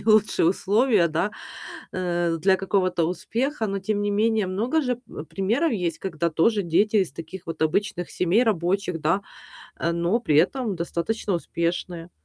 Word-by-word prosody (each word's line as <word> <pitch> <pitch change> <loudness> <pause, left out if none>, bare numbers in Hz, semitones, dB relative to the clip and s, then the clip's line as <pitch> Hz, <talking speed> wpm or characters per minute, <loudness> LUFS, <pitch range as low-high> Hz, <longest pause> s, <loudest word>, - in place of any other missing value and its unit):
не - - -11
лучшие 215 -5 +4
условия, 205 +1 +3
да, 170 +5 -1 0.6
э, 175 -2 -1
для 190 +2 +4
какого-то 185 -2 +1
успеха, 225 - -2
но 195 -1 -2
тем 205 +2 -1
не 205 0 0
менее, 215 -1 +2
много 230 +12 0
же, 250 -4 -1
вэп 155 - -9
примеров 225 - 0
есть, 175 -6 -2
когда 170 -3 -2
тоже 205 +6 +2
дети 205 +6 +2
из 185 -9 +2
таких 165 +4 -8
вот 165 -1 -6
обычных 180 +2 0
семей, 185 +7 +2
рабочих, 180 -4 0
да, 165 +6 +2 0.6
а, 170 - -1
но 170 +6 +1
при 155 -11 +1
этом 200 - +2
достаточно 175 +5 -2
успешные. 170 0 -3
190 Hz, 160 wpm, -24 LUFS, 170-215 Hz, 0.6 s, лучшие